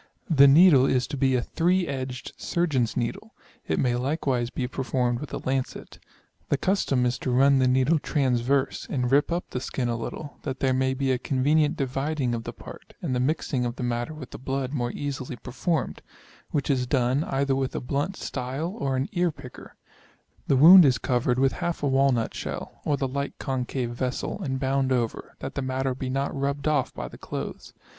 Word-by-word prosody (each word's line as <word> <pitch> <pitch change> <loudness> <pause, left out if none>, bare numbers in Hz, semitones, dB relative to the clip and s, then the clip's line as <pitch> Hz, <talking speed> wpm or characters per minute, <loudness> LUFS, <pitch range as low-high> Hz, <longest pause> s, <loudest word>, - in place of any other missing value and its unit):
The 140 -3 +7
needle 140 -2 +7
is 125 -1 +2
to 145 - -5
be 135 -1 +2
a 120 - +1
three 180 +2 +1
edged 130 -2 -5
surgeon's 140 -10 0
needle; 115 - -3 0.3
it 80 - 0
may 125 -2 +2
likewise 130 -2 -1
be 125 -1 -3
per 135 - -5
formed 125 -2 0
with 150 - -7
a - - -3
lancet: 130 0 -3 0.5
the 145 - +2
custom 140 -8 +1
is 120 0 0
to - - -3
run 135 +2 +4
the 130 - +3
needle 130 +5 +3
transverse, 135 -2 0
and 125 -3 -1
rip 145 +4 +3
up 175 +1 -3
the 125 - -2
skin 125 -1 -3
a 120 - 0
little, 140 +5 -6
that 135 -2 -4
there 130 -1 +2
may 130 0 +1
be 135 0 0
a 125 - +1
convenient 145 +4 +2
dividing 135 -1 -1
of 115 -1 -4
the - - -4
part, - - -12
and 145 -7 -1
the 125 - 0
mixing 135 -1 0
of 120 0 -2
the 130 - -5
matter 120 +5 -2
with 140 -5 -9
the - - -8
blood 135 0 -3
more 120 -4 -1
easily 135 -2 -4
performed; 135 +6 -2 0.5
which 145 -1 0
is 125 -2 0
done, 130 +2 +1
either 135 0 0
with 135 -1 -2
a - - 0
blunt 140 +9 -2
stile, 140 +8 -4
or 135 -8 0
an 130 +1 0
ear 175 -1 +1
picker: 135 -5 -11 0.7
the 135 - +3
wound 175 +6 +10
is 130 -5 +4
covered 125 +1 0
with 135 0 +3
half 175 -3 -3
a - - +2
walnut 135 -4 +2
shell, - - -6
or 145 - +1
the 135 - -1
like 140 +2 -4
concave 130 -2 -2
vessel, 125 - -3
and 135 -6 -2
bound 135 0 0
over, 120 -3 -2
that - - -5
the - - -3
matter 130 0 -1
be 130 0 -5
not 135 +2 -1
rubbed 140 +1 -2
off" 145 -4 +1
by - - -6
the - - -12
clothes. - - -6
135 Hz, 205 wpm, -26 LUFS, 125-145 Hz, 0.7 s, wound